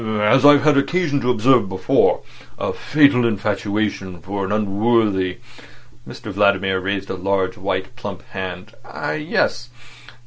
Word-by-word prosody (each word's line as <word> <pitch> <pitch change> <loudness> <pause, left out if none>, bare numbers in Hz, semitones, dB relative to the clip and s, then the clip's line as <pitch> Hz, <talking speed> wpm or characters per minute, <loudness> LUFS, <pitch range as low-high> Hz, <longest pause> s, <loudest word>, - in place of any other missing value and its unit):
"As 110 +4 +2
I've 145 -1 +6
had 150 -2 +4
occasion 150 -2 0
to 125 - -1
observe 125 -2 +3
before, 95 -1 +1 0.4
a - - -3
fatal 140 -4 +3
infatuation 100 -3 -2
for 100 +4 -5
an 95 - -3
unworthy—" 105 -2 +1 0.7
Mr 105 - -8
Vladimir 95 -1 +1
raised 95 +1 -3
a - - -3
large 95 0 -1
white, - - -4
plump - - -8
hand. 95 -1 -7
"Ah, - - -5
yes. 135 -5 -1
105 Hz, 135 wpm, -20 LUFS, 95-125 Hz, 0.7 s, I've